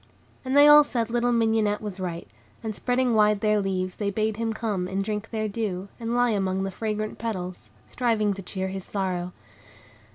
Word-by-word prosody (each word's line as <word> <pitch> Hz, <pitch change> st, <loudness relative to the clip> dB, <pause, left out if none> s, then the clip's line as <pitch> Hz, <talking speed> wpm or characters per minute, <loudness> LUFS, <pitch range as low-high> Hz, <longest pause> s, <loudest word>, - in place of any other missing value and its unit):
And 260 Hz, +2 st, 0 dB
they 290 Hz, +1 st, +9 dB
all 295 Hz, 0 st, +9 dB
said 235 Hz, -5 st, -2 dB
little 240 Hz, 0 st, +1 dB
Mignonette 220 Hz, -3 st, +2 dB
was 205 Hz, -3 st, -6 dB
right; 175 Hz, -2 st, -4 dB, 0.4 s
and, 220 Hz, -1 st, -3 dB
spreading 250 Hz, +2 st, 0 dB
wide 210 Hz, -1 st, +3 dB
their 215 Hz, -1 st, +2 dB
leaves, 185 Hz, -1 st, -2 dB
they 205 Hz, -2 st, -1 dB
bade 215 Hz, +1 st, -1 dB
him 230 Hz, 0 st, -1 dB
come, 210 Hz, -5 st, -2 dB
and 195 Hz, +1 st, -2 dB
drink 210 Hz, +1 st, -4 dB
their 215 Hz, -1 st, -2 dB
dew, 200 Hz, -3 st, -3 dB
and 230 Hz, 0 st, -2 dB
lie 245 Hz, -1 st, +3 dB
among 190 Hz, -2 st, 0 dB
the 195 Hz, -, -3 dB
fragrant 215 Hz, 0 st, -3 dB
petals, 185 Hz, -5 st, -5 dB, 0.2 s
striving 220 Hz, -4 st, 0 dB
to 195 Hz, -, -7 dB
cheer 190 Hz, +1 st, -4 dB
his 190 Hz, 0 st, -5 dB
sorrow. 180 Hz, -3 st, -3 dB
210 Hz, 190 wpm, -25 LUFS, 190-230 Hz, 0.4 s, they